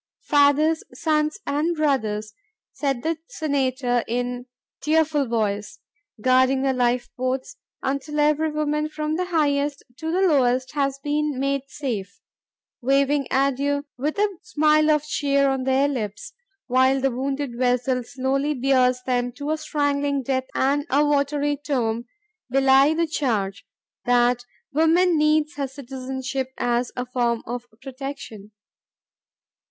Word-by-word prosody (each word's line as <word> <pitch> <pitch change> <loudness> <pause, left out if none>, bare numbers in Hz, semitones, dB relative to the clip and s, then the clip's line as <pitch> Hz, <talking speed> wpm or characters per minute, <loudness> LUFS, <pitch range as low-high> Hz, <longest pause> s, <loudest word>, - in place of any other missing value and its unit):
"Fathers, 295 +2 +3
sons, 305 +2 0
and 310 +4 0
brothers," 220 -8 0 0.4
said 275 -4 -2
the 325 0 -1
Senator 260 -5 0
in 245 +1 -3 0.3
tearful 305 -2 +2
voice, 210 -3 -2 0.4
"guarding 260 +3 +3
the 270 -1 +2
lifeboats 250 +1 -1 0.3
until 280 +3 -2
every 300 +1 +3
woman 300 0 -1
from 305 0 -2
the 365 +2 -1
highest 290 -4 0
to 320 0 -3
the 365 +3 +1
lowest 260 -7 +2
has 275 -2 0
been 295 -1 0
made 275 0 0
safe, 220 -10 -5 0.6
waving 275 +2 +2
adieu 275 +1 +1
with 295 +7 -2
a 405 -3 0
smile 305 +7 +3
of 300 -1 +3
cheer 280 -2 +1
on 265 -1 0
their 265 +1 +3
lips, 215 -7 -4 0.3
while 260 +1 +3
the 270 0 +1
wounded 270 0 -3
vessel 250 +1 +1
slowly 275 +4 -1
bears 255 -1 +2
them 245 -1 0
to 285 +3 -4
a 315 - 0
strangling 285 -2 0
death 260 0 -1
and 280 +2 +2
a 290 +3 +3
watery 290 0 +1
tomb, 245 -6 -2 0.4
belie 270 +3 +5
the 335 +1 +2
charge.. 220 -11 -2 0.2
" - - -58
that 245 0 +3 0.3
woman 330 +4 +4
needs 305 0 +2
her 280 -1 -1
citizenship 265 0 -5
as 240 0 0
a 250 - -3
form 240 -2 -1
of 245 +1 -5 0.2
protection. 270 -6 -7
275 Hz, 130 wpm, -23 LUFS, 250-295 Hz, 0.6 s, belie